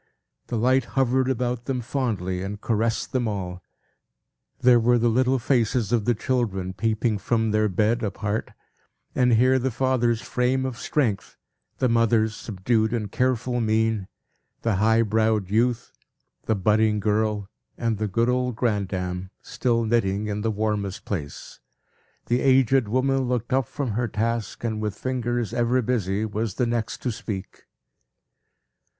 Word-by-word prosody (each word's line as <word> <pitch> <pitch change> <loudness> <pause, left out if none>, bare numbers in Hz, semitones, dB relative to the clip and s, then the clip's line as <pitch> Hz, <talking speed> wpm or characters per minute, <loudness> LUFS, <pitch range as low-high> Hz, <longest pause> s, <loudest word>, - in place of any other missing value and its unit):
The 120 - -2
light 130 +2 +3
hovered 130 0 +2
about 125 -1 -1
them 130 0 -1
fondly, 110 -8 -2
and 100 +2 -5
caressed 115 +1 -1
them 125 -3 0
all. 90 -4 -4 1.0
There 120 -1 +6
were 120 +1 +3
the 120 0 +2
little 130 +3 +2
faces 120 -3 +1
of 115 -4 +1
the 120 - +2
children, 105 -6 -1
peeping 110 +2 0
from 110 +2 0
their 110 0 +2
bed 110 +5 +1
apart, 105 0 -2 0.6
and 125 -1 +3
here 130 +3 +4
the 130 +1 0
father's 120 -2 +1
frame 125 +3 0
of 130 -3 -4
strength, 120 -10 -1 0.4
the 130 - +2
mother's 115 -2 +2
subdued 110 +2 0
and 105 -4 -2
careful 125 -1 0
mien, 110 -2 +1 0.6
the 110 -4 +1
high 110 +3 +4
browed 110 -2 +1
youth, 120 +2 +1 0.6
the 110 - +2
budding 105 +2 +2
girl, 105 -1 0 0.3
and 115 -3 -1
the 110 - 0
good 115 +4 +1
old 125 -1 0
grandam, 95 -5 -2
still 115 -2 0
knitting 110 -3 +1
in 105 0 -3
the 115 - 0
warmest 105 -2 -2
place. 75 -8 -6 0.7
The 120 +1 +1
aged 130 -2 +4
woman 130 +3 +1
looked 120 -1 -1
up 130 -3 +2
from 140 -6 -3
her 120 +3 -1
task, 115 +1 -2
and, 110 -2 -2
with 105 -2 -2
fingers 120 -2 -2
ever 120 +1 +2
busy, 105 -3 0
was 110 -1 -3
the 125 - +1
next 115 -1 -2
to 125 - 0
speak. 100 -3 -7
115 Hz, 150 wpm, -24 LUFS, 105-125 Hz, 1.0 s, There